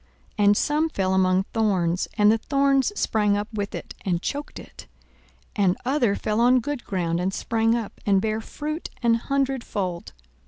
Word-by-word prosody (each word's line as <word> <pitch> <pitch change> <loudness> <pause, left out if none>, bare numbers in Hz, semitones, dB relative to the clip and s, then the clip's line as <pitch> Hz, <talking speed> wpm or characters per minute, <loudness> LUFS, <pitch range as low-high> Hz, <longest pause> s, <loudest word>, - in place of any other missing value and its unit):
42:008:007 205 - +4
And 205 0 +5
some 305 +2 +1
fell 190 -9 -1
among 185 0 +3
thorns; 185 -6 +1
and 210 0 +5
the 225 - +2
thorns 275 - +2
sprang 210 -2 +2
up 205 0 -3
with 205 -2 -3
it, - - -7
and 175 -3 0
choked 285 +10 -5
it. - - -12 0.7
42:008:008 205 - +1
And 180 - +2
other 250 -6 +2
fell 215 +1 -1
on 250 +2 +5
good 280 +1 -4
ground, 170 -3 -1
and 185 +2 0
sprang 225 +3 +1
up, 230 -3 -5
and 195 -2 +3
bare 220 +2 -1
fruit 305 +7 -5
an 235 -1 +4
hundredfold. 235 - -2
215 Hz, 175 wpm, -24 LUFS, 195-260 Hz, 0.7 s, And